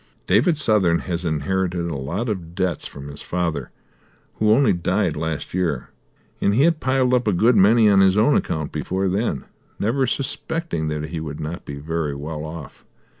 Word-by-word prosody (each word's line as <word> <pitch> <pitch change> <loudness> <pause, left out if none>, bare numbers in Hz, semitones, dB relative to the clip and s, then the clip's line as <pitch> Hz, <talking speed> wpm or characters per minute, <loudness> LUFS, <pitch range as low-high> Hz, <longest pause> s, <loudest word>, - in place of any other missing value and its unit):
"David 120 - +3
Southern 105 - +3
has 90 -1 -3
inherited 85 +3 -1
a 85 -3 -3
lot 70 - -3
of 90 -6 -4
debts 90 -4 -1
from 70 0 -10
his 70 0 -9
father, 85 -7 -2 0.7
who 110 - +2
only 110 -1 +5
died 90 0 0
last 80 0 -4
year, 85 -8 -1 0.5
and 100 - +2
he 135 - +4
had 165 -1 +3
piled 130 -2 +1
up 125 -2 +2
a - - +4
good 110 +7 +3
many 110 +3 +6
on 100 -2 +5
his 95 0 +4
own 115 +7 +4
account 80 -2 -1
before 95 +6 -2
then, 95 - -1 0.3
never 130 +5 +1
suspecting 140 - -2
that 75 0 -3
he 80 -1 -4
would 75 -2 -6
not 80 +2 -5
be 70 - -6
very 75 0 -3
well 75 +2 -5
off. 80 -2 -9
90 Hz, 180 wpm, -22 LUFS, 80-110 Hz, 0.7 s, many